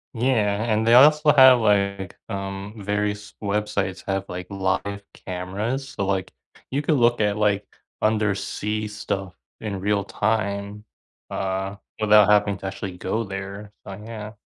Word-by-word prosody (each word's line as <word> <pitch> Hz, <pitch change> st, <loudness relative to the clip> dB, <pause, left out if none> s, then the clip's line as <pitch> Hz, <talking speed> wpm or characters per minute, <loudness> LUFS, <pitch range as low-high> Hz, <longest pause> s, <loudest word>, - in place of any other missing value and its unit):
Yeah, 110 Hz, -4 st, +1 dB
and 110 Hz, +1 st, +1 dB
they 115 Hz, -, +5 dB
also 150 Hz, +3 st, +7 dB
have 130 Hz, -3 st, +8 dB
like, 100 Hz, -3 st, 0 dB
um, 100 Hz, +1 st, -5 dB
various 105 Hz, +1 st, -2 dB
websites 100 Hz, -2 st, -2 dB
have, 95 Hz, 0 st, -1 dB
like, 90 Hz, 0 st, -5 dB
live 100 Hz, +1 st, -2 dB
cameras. 100 Hz, +9 st, -4 dB
So, 100 Hz, -, -3 dB
like, 95 Hz, -1 st, -1 dB, 0.4 s
you 140 Hz, +3 st, -1 dB
could 150 Hz, -, +2 dB
look 120 Hz, -1 st, +3 dB
at, 105 Hz, -1 st, +1 dB
like, 105 Hz, -1 st, +1 dB, 0.3 s
undersea 105 Hz, 0 st, -1 dB
stuff 100 Hz, -3 st, -4 dB, 0.2 s
in 100 Hz, -3 st, -4 dB
real 100 Hz, +1 st, 0 dB
time, 105 Hz, 0 st, -2 dB, 0.5 s
uh, 95 Hz, +1 st, -3 dB, 0.2 s
without 105 Hz, -1 st, +6 dB
having 105 Hz, -1 st, +3 dB
to 95 Hz, -, -5 dB
actually 95 Hz, -1 st, -5 dB
go 110 Hz, +5 st, -1 dB
there. 100 Hz, +1 st, -7 dB
So, 100 Hz, -, -6 dB
yeah. 105 Hz, +1 st, -8 dB
105 Hz, 140 wpm, -23 LUFS, 100-110 Hz, 0.5 s, have